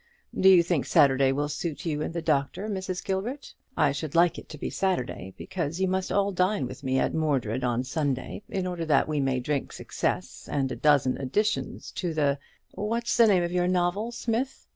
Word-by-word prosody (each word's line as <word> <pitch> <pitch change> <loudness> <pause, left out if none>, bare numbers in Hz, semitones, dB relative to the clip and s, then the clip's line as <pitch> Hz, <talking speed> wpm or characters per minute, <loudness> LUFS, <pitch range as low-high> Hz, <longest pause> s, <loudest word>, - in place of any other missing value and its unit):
Do 190 - +5
you 180 -3 +7
think 170 -5 0
Saturday 135 -1 +4
will 145 +2 0
suit 150 +3 -4
you 150 -2 -1
and 155 - -2
the 170 -1 -4
Doctor, 155 +6 0
Mrs. 190 -3 -4
Gilbert? 215 +9 -3 0.2
I 145 - +4
should 145 +2 -5
like 170 0 +4
it - - -14
to 155 - -8
be - - -4
Saturday, 125 - -2
because 170 -2 -4
you 190 - +2
must 185 0 -1
all 200 0 +2
dine 185 -4 +1
with 130 +2 -8
me 130 0 0
at - - +1
Mordred 135 -7 0
on 125 0 0
Sunday, 135 +3 -2
in 190 -1 -2
order 175 -2 -3
that 150 -4 +3
we 155 -1 -1
may 135 -2 +1
drink 140 +2 -2
success - - -3
and 135 -2 0
a - - -2
dozen 140 -4 +3
editions 210 - -1
to 175 -4 -3
the 140 -2 +1 0.3
what's 230 +4 -1
the 230 - +6
name 185 -4 +4
of 170 - -2
your 180 0 +1
novel, 185 +5 0
Smith? 235 +3 -2
165 Hz, 205 wpm, -27 LUFS, 140-190 Hz, 0.3 s, you